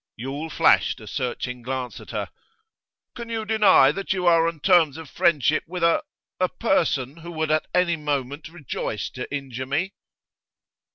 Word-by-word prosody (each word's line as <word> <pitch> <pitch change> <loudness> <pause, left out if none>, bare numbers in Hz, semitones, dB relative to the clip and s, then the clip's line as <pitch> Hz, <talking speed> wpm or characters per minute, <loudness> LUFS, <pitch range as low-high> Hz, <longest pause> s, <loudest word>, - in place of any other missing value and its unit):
Yule 140 +7 -5
flashed - - +3
a - - -11
searching 125 0 -4
glance 130 0 -4
at - - -13
her. - - -3 0.9
'Can 235 -1 -7
you 225 -1 -3
deny 210 -11 +5
that 195 +4 -2
you 185 -2 -2
are 165 -1 +5
on 165 -2 -4
terms 160 -3 +4
of 160 -2 -9
friendship 155 +1 +2
with 180 0 -4
a 170 0 +4 0.4
a 185 -1 +2
person 160 - 0
who 170 +1 -9
would 160 -1 -1
at 155 0 +1
any 175 -2 +2
moment 145 0 -3
rejoice 145 - -4
to 125 - -7
injure 130 -3 -5
me? 165 +8 -1
155 Hz, 165 wpm, -24 LUFS, 135-175 Hz, 0.9 s, deny